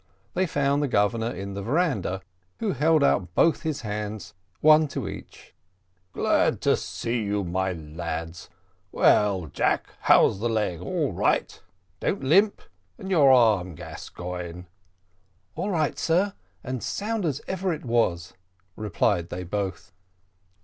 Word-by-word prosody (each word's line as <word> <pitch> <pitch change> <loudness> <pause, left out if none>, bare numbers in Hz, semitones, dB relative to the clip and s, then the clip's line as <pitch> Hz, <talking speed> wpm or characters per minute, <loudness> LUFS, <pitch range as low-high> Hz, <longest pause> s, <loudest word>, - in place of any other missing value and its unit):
They 185 +1 +1
found 140 -1 +1
the 145 - +1
Governor 110 0 +1
in 100 -2 -6
the 100 - -5
veranda, 115 - 0 0.3
Who 220 -3 -1
held 155 +1 +3
out 90 -10 +1
both 165 -3 +3
his 155 -4 -3
hands, 105 -3 -5 0.3
one 155 0 +6
to 140 - -4
each. - - -10 0.6
"Glad - - +1
to - - +3
see 115 0 -3
you, 100 -1 -1
my 95 +1 -1
lads. 80 +1 -6 0.4
Well, 100 -4 +3
Jack, 75 - -1
how's 95 - +4
the 120 +3 -1
leg, 105 -7 -1
all - - -1
right? - - 0 0.4
don't - - -1
limp. 195 +10 +3 0.3
And 190 - -7
your 145 -7 +6
arm, 105 -9 +4
Gascoigne?" 90 +2 -7 0.9
"All 205 - -2
right, 160 -6 0
sir, 185 +5 +1 0.3
and 130 0 -3
as - - -6
sound 215 +1 -2
as 150 -5 -1
ever 190 0 -1
it 155 -4 -5
was," 90 -8 0 0.4
replied 90 -4 0
they 90 +1 -5
both. 100 +2 -4
110 Hz, 140 wpm, -25 LUFS, 90-155 Hz, 0.9 s, one